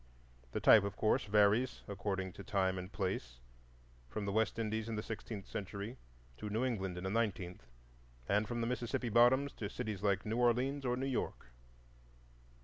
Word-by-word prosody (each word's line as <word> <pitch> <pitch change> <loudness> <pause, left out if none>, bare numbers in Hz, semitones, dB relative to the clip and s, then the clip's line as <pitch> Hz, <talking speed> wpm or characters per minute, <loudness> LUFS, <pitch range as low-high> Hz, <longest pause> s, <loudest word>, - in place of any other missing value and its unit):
The - - -1
type, 110 - +8
of 100 - -3
course, 110 - +2
varies 105 +4 +3
according 95 -2 -3
to - - -9
time 95 -1 +1
and 90 +2 -7
place, 90 - -3 0.7
from 105 - -3
the 100 - -1
West 110 +2 +1
Indies 110 0 -2
in 115 - -2
the 105 - -3
sixteenth 110 -3 -6
century 100 +4 -5 0.4
to 105 - -5
New 110 +5 0
England 95 -7 -2
in 90 - -5
the 95 - -2
nineteenth, 95 - -2 0.6
and 105 +2 +2
from 120 0 -2
the 115 - 0
Mississippi 125 0 -1
bottoms 125 +5 +5
to 105 - -5
cities 105 -3 -4
like 100 -2 +1
New 110 +2 -1
Orleans 125 +3 +2
or 125 0 +1
New 135 - -1
York. 125 - -3
105 Hz, 175 wpm, -35 LUFS, 100-120 Hz, 0.7 s, type